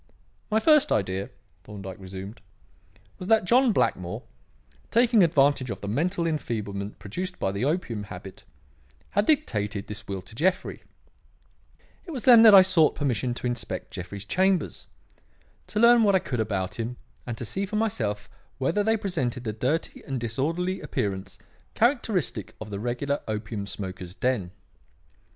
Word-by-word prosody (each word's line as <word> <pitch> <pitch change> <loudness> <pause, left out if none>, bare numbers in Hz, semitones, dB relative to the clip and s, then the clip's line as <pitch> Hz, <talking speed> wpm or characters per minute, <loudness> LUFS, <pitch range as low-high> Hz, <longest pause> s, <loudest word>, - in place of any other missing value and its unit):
"My 220 0 +3
first 300 +3 +4
idea," 95 -1 0 0.3
Thorndyke 100 -2 -8
resumed, 95 +4 -8 0.8
"was 180 - -6
that 220 -3 +4
John 245 +4 +4
Blackmore, 90 - 0 0.7
taking 235 -2 +4
advantage 140 -6 +3
of - - -5
the 100 - -5
mental 170 - 0
enfeeblement 105 -10 -3
produced 180 - -5
by 95 - -1
the 100 +6 -2
opium 140 - -1
habit, 95 0 -10 0.7
had 205 +1 +1
dictated 105 - +1
this 105 0 -8
will 95 -2 -4
to 95 - -12
Jeffrey, 180 +10 0 1.2
It 380 - -13
was 270 -7 -5
then 240 -3 +9
that 220 -3 +9
I 190 - +10
sought 170 -5 +3
permission 125 -3 -1
to - - -6
inspect 120 -1 -3
Jeffrey's 95 +3 -7
chambers; 185 - 0 0.8
to 210 - -2
learn 235 +1 +7
what 200 -3 +4
I - - +5
could 125 -8 -4
about 100 -2 -2
him 120 +2 -3 0.3
and 120 -2 -4
to 120 - -5
see 195 - -3
for 210 - -5
myself 110 - -1 0.3
whether 165 +10 +1
they 220 +1 +2
presented 135 - -2
the 110 -3 -3
dirty 130 +9 -2
and 135 -2 -3
disorderly 165 - -1
appearance 95 -1 -3 0.4
characteristic 220 - 0
of 105 -1 -8
the 100 - -4
regular 125 +5 -1
opium 105 -1 -4
smoker's 95 -3 -6
den. 125 -8 0
125 Hz, 150 wpm, -26 LUFS, -, 1.2 s, I